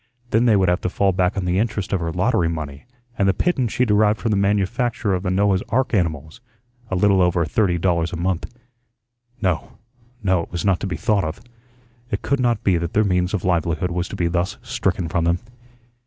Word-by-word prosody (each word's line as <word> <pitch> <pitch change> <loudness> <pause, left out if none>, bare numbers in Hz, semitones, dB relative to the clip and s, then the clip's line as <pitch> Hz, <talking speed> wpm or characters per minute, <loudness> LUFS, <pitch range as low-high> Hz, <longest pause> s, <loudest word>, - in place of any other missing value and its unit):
Then 115 +2 +3
they 115 -3 +5
would 95 -2 +3
have 90 +1 +1
to - - -1
fall 100 +2 +2
back 90 +2 0
on 95 - -1
the 90 +1 +1
interest 105 -2 -2
of 95 - +2
her 85 -1 -2
lottery 90 -1 +1
money 75 -4 -6 0.3
and 100 -1 +3
the 95 - +2
pittance 130 - 0
she 125 - +1
derived 105 -1 +3
from 115 - -1
the - - +2
manufacture 105 +3 0
of 90 - 0
the 95 - -2
Noah's 95 0 +2
ark 130 +4 0
animals, 80 0 -1 0.5
a 95 - -1
little 95 0 +3
over 90 -1 +2
thirty 90 0 +1
dollars 85 -1 0
a - - -4
month. 90 +3 -2 0.9
No, 90 -3 -1 0.5
no, 95 -3 +2
it - - -9
was 90 +1 -3
not 95 -2 +2
to - - -3
be 90 - -3
thought 105 -5 +1
of. 80 +1 -4 0.7
It - - -3
could 140 - 0
not 120 -4 +1
be 95 -3 +3
that 85 -1 -3
their 110 - +3
means 90 -1 +1
of 95 - -4
livelihood 85 0 0
was 90 +1 -2
to - - -7
be 85 - -1
thus 85 +2 -1
stricken 90 -2 -1
from 85 +1 0
them. 85 +1 +2
95 Hz, 220 wpm, -21 LUFS, 85-105 Hz, 0.9 s, they